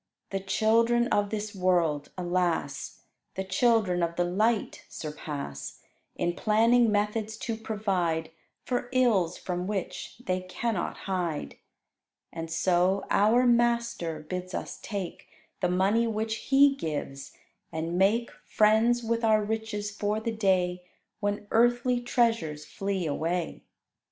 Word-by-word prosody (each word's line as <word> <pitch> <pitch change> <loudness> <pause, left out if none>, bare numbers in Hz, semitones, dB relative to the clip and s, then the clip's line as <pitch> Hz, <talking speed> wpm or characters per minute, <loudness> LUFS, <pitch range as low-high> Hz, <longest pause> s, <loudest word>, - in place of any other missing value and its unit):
The 195 - -1
children 230 +4 +2
of 205 0 +1
this 215 0 -4
world, 175 -6 +1
alas! 175 -5 -1 0.3
The 190 - -2
children 190 -2 +2
of 170 0 -1
the 175 - +2
light 210 +5 0
surpass, 145 - -6 0.4
In 175 - 0
planning 230 +4 +3
methods 210 +1 -1
to 230 0 -3
provide 190 -8 -1 0.3
For 245 -1 -2
ills 220 -10 +3
from 180 0 -3
which 200 -3 -4
they 185 0 0
cannot 185 +2 -3
hide. 175 - -2 0.8
And 165 0 -5
so 180 +3 +2
our 225 +5 +4
Master 235 -9 +1
bids 180 +4 -5
us - - -5
take 200 -5 -5 0.3
The 180 - +1
money 200 +6 +2
which 220 0 -3
He 275 +1 +6
gives, 145 - -5 0.4
and 165 +2 -3
make 210 +6 +2
Friends 220 +3 +3
with 230 +1 -1
our 215 -1 +4
riches 215 -1 -3
for 210 +1 -1
the 230 +1 -2
day 185 -4 +1 0.4
When 205 0 -2
earthly 240 +1 +3
treasures 225 -12 0
flee 195 -2 -3
away. 165 +3 -2
205 Hz, 125 wpm, -28 LUFS, 175-225 Hz, 0.8 s, He